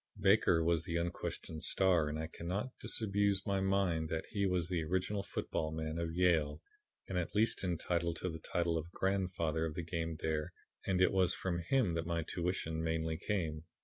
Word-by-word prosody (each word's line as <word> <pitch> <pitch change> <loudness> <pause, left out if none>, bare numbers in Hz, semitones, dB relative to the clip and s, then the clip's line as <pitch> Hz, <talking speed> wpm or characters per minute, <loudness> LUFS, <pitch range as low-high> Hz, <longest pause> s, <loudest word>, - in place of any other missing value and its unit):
Baker 95 -4 +4
was 85 -1 +2
the 85 -2 -3
unquestioned 85 -2 -3
star 90 -5 +3
and 75 - -3
I 80 - -2
cannot 90 +9 -3
disabuse 100 -2 +1
my 100 -2 +1
mind 95 -5 +1
that 80 - -2
he 100 -2 +1
was 90 -3 +1
the 90 -2 0
original 95 +5 0
football 80 -4 -2
man 80 +1 -3
of 85 -1 -1
Yale, 80 -5 +3 0.5
and 90 - -1
at 85 - -4
least 110 0 +2
entitled 85 -1 0
to 90 - -2
the 80 - -6
title 85 -1 0
of 80 +2 -7
'grandfather' 90 -4 0
of 75 - -6
the 85 - -3
game 80 -1 -3
there 80 -1 -1 0.3
and 95 -1 +3
it 95 - +4
was 95 -2 +3
from 90 -2 -2
him 100 +1 +2
that 85 0 -2
my 85 -1 0
tuition 85 -1 -2
mainly 80 0 0
came. 80 -7 -2
85 Hz, 185 wpm, -35 LUFS, 80-95 Hz, 0.5 s, Baker